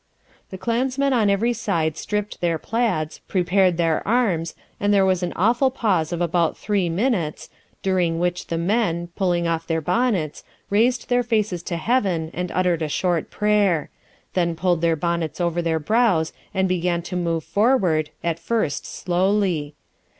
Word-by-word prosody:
The 190 - -7
clansmen 260 +6 0
on 220 -5 +3
every 220 +5 +2
side 170 -9 -1
stript 210 +5 -4
their 170 -2 +1
plaids, 185 -7 -1
prepared 185 -1 +2
their 165 -2 +1
arms, 200 -8 +1 0.2
and 205 0 +1
there 200 -1 +4
was 185 -1 +2
an 180 - -2
awful 235 +8 +3
pause 195 -11 0
of 175 0 -2
about 170 -1 +1
three 200 -4 0
minutes, 180 - -1 0.3
during 180 -3 +1
which 175 +1 -1
the 165 - -2
men, 175 -2 0
pulling 175 -3 +1
off 165 0 -2
their 165 -1 0
bonnets, 185 -3 0 0.3
raised 235 +4 +2
their 245 0 +3
faces 215 -7 0
to 170 0 -4
heaven 180 -6 0
and 180 0 -3
uttered 180 -3 +1
a 155 - -1
short 175 +1 0
prayer; 205 -6 +1 0.4
then 170 -2 +1
pulled 175 -1 +1
their 165 -1 +2
bonnets 170 0 -2
over 175 -1 0
their 165 -1 0
brows 185 -1 +2 0.2
and 190 -1 +1
began 175 -1 0
to 180 +1 -6
move 165 -2 -1
forward, 175 - +2
at 170 -1 -1
first 170 -5 -1
slowly. 180 -4 0
180 Hz, 160 wpm, -22 LUFS, 165-210 Hz, 0.4 s, there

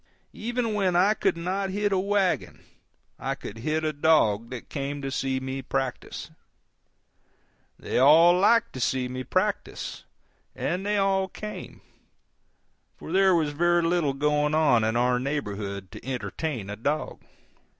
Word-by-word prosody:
Even 235 0 -2
when 190 -4 +1
I 190 +4 +5
could 190 - 0
not 190 +3 -2
hit 205 +2 0
a 190 - +2
wagon 190 - 0 0.6
I - - -2
could 110 - -9
hit 155 +6 -1
a 155 0 0
dog 115 -8 +3
that 125 -2 -7
came 140 0 -4
to 135 - -3
see 135 0 -1
me 130 +1 -4
practice. 130 -1 -4 1.5
They - - -2
all 160 +6 +7
liked 230 +6 +3
to 130 - -6
see 130 +1 0
me 130 +1 -5
practice, - - -2 0.5
and 180 +2 -2
they 205 +1 0
all 195 -1 +2
came, 210 +3 -8 1.2
for - - -9
there 190 0 +4
was 155 -3 +1
very 175 +3 +2
little 165 -4 +1
going 150 +2 +1
on 145 -8 +4
in 110 +1 0
our 125 +1 +2
neighborhood 100 -8 -4
to - - -10
entertain 120 -1 -4
a - - -4
dog. 145 +8 -2
150 Hz, 150 wpm, -26 LUFS, 130-185 Hz, 1.5 s, all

